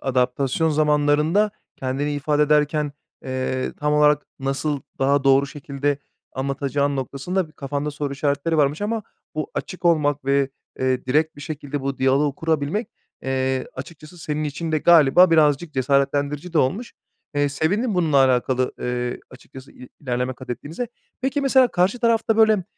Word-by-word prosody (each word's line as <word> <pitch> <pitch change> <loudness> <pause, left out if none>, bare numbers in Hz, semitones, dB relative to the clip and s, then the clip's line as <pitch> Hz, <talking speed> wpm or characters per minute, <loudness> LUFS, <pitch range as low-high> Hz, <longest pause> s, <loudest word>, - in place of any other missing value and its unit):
adaptasyon 130 +4 0
zamanlarında 150 +6 +2 0.3
kendini 135 +3 -2
ifade 150 +1 +1
ederken, 150 0 +2 0.3
eee, 130 0 -2
tam 150 0 0
olarak 150 0 +4 0.2
nasıl 135 +1 -2 0.2
daha 140 +1 +2
doğru 135 +1 +5
şekilde 140 0 -3 0.3
anlatacağın 140 +1 -1
noktasında 140 +8 -2
bir - - -20
kafanda 145 +1 -3
soru 145 -1 -4
işaretleri 145 +3 0
varmış 145 +3 +1
ama 220 +1 -1 0.3
bu 155 - -3
açık 185 - -6
olmak 150 -4 +2
ve, 140 0 +2 0.3
eee, 130 -1 0
direkt 155 +4 +1
bir - - -11
şekilde 145 -2 -5
bu 135 0 -3
diyaloğu 135 +2 +2
kurabilmek, 160 +7 -1 0.3
eee, 130 0 -1
açıkçası 155 +5 -10
senin 155 -1 -3
için 155 +2 -4
de 155 - +3
galiba 170 +2 +6
birazcık 155 0 +3
cesaretlendirici 140 +4 0
de 165 - +2
olmuş. 190 - 0 0.4
Eee, 145 0 +2
sevindim 200 - 0
bununla 160 -5 +2
alakalı, 130 -1 +2
eee, 125 0 -2
açıkçası 130 +1 -13
i 125 - -13
ilerleme 125 -2 -2
katettiğinize. 145 - -6 0.3
Peki, 270 +3 0
mesela 265 -2 +4
karşı 190 +6 +1
tarafta, 225 -2 +2
böyle, 220 -4 +4
145 Hz, 145 wpm, -22 LUFS, 135-160 Hz, 0.4 s, galiba